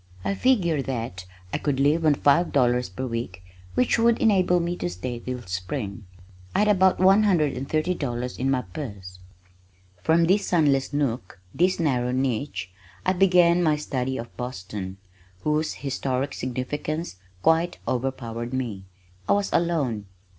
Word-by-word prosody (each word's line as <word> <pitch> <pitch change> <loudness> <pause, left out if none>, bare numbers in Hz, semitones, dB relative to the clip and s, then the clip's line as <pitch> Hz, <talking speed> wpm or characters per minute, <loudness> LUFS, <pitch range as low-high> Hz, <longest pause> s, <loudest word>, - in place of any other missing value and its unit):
I - - +1
figured 185 - +2
that 115 -8 -4 0.3
I - - 0
could 140 -3 -1
live 150 +4 +3
on 150 - +5
five 165 +6 +3
dollars 125 -4 +2
per 130 +8 -5
week 115 -6 -4 0.3
which 250 -1 +2
would 230 0 +4
enable 185 -5 +3
me 170 +1 -1
to 90 - -2
stay 115 +8 -5
till 125 0 -5
spring. 100 +2 -5 0.5
I 210 - +4
had - - +2
about 190 -2 +4
one 190 +3 +6
hundred 170 -9 +3
and 130 +2 -5
thirty 155 +4 +1
dollars 125 -6 -4
in 130 +2 +1
my 130 -2 +1
purse. 95 -4 -8 0.8
From 165 - +3
this 195 +4 +2
sunless 145 -6 +2
nook, 130 -10 -2
this 180 +2 +2
narrow 125 -6 +1
niche, 125 -7 -2 0.3
I 185 - +3
began 180 -2 +5
my 155 -3 +3
study 130 -3 -2
of 115 - -8
Boston, 95 -6 -5 0.4
whose 155 +1 0
historic 135 0 -2
significance 140 - -3 0.3
quite 165 +2 +3
overpowered 120 -2 -3
me. 110 -7 -3 0.4
I - - +6
was 200 0 0
alone. 140 -12 0
135 Hz, 155 wpm, -25 LUFS, 120-170 Hz, 0.8 s, one